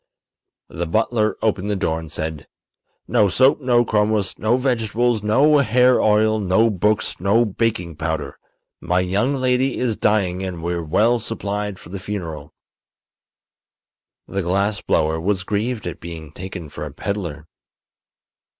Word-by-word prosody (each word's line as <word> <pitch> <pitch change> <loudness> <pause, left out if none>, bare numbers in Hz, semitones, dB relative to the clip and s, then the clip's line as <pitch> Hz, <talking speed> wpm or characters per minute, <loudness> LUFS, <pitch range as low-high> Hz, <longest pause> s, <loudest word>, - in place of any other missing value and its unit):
The 85 0 -4
butler 110 +3 +1
opened 105 -2 0
the 105 - 0
door 80 -4 -1
and 80 -2 -9
said: 80 -2 -4 0.6
"No 105 - +3
soap, 130 +9 +3
no 120 -2 +3
chromos, 105 -2 +1
no 110 +4 +2
vegetables, 120 -2 0
no 140 +8 +4
hair 125 0 +4
oil, 110 +1 +3
no 105 +4 +3
books, 105 +2 0
no 100 +6 +3
baking 105 -6 -2
powder. 80 -1 -3 0.4
My 90 +1 +1
young 100 +10 0
lady 130 0 +1
is 120 -4 0
dying 95 -4 +1
and 90 -3 -5
we're 85 0 -1
well 110 +10 +2
supplied 105 -2 -3
for 80 - -13
the 100 +2 -6
funeral." 85 -7 -6 1.8
The 100 - -2
glass 100 +4 0
blower 80 +1 +1
was 95 +1 0
grieved 110 +3 -2
at 85 - -5
being 80 -3 -8
taken 90 -1 -8
for 75 +1 -7
a 75 - -6
peddler. 85 -2 -4
100 Hz, 140 wpm, -21 LUFS, 85-115 Hz, 1.8 s, no